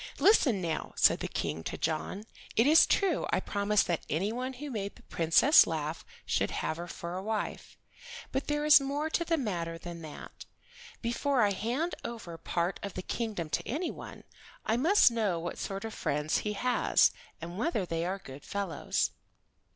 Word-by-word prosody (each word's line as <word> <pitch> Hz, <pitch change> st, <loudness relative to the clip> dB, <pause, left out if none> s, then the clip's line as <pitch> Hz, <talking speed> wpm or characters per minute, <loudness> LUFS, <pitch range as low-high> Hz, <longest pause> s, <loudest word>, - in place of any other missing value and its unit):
"Listen, 270 Hz, -, +4 dB
now," 160 Hz, -2 st, -3 dB
said -, -, +5 dB
the -, -, -3 dB
King 80 Hz, +2 st, -3 dB
to -, -, -4 dB
John. 165 Hz, +5 st, -2 dB, 0.3 s
"It 230 Hz, -, +4 dB
is 310 Hz, +3 st, +7 dB
true 395 Hz, -2 st, +1 dB
I -, -, +2 dB
promised 205 Hz, 0 st, +1 dB
that 170 Hz, -2 st, -1 dB
anyone 225 Hz, -, -1 dB
who 280 Hz, +3 st, -7 dB
made 200 Hz, -4 st, -4 dB
the -, -, -18 dB
Princess 170 Hz, -, +5 dB
laugh 155 Hz, 0 st, -3 dB, 0.2 s
should -, -, +1 dB
have 155 Hz, -, -2 dB
her 175 Hz, +1 st, -6 dB
for 170 Hz, 0 st, -6 dB
a 185 Hz, -, -3 dB
wife, 215 Hz, +1 st, -4 dB, 0.5 s
but 270 Hz, -, -2 dB
there 295 Hz, 0 st, 0 dB
is 300 Hz, -1 st, +8 dB
more 290 Hz, +3 st, -2 dB
to 340 Hz, -, +1 dB
the 330 Hz, 0 st, +1 dB
matter 170 Hz, -, -3 dB
than 170 Hz, 0 st, -8 dB
that. 155 Hz, -2 st, -10 dB, 0.6 s
Before 240 Hz, +2 st, +1 dB
I 205 Hz, -, +3 dB
hand 245 Hz, -, -1 dB
over 220 Hz, -8 st, -6 dB
part 170 Hz, +3 st, -1 dB
of 200 Hz, -2 st, -6 dB
the 185 Hz, -, -4 dB
kingdom 215 Hz, -8 st, -3 dB
to -, -, -1 dB
anyone, 315 Hz, +9 st, -5 dB, 0.4 s
I 220 Hz, -, +2 dB
must 320 Hz, -, +5 dB
know 215 Hz, -7 st, 0 dB
what 170 Hz, +1 st, -5 dB
sort 195 Hz, +2 st, -4 dB
of 220 Hz, -, -5 dB
friends 150 Hz, +2 st, 0 dB
he 210 Hz, -, -2 dB
has, 250 Hz, +4 st, +3 dB, 0.3 s
and 170 Hz, +3 st, -7 dB
whether 235 Hz, -, 0 dB
they 165 Hz, -1 st, -2 dB
are 185 Hz, +3 st, -2 dB
good 140 Hz, -7 st, -11 dB
fellows. 195 Hz, -7 st, -1 dB
205 Hz, 180 wpm, -30 LUFS, 170-260 Hz, 0.6 s, is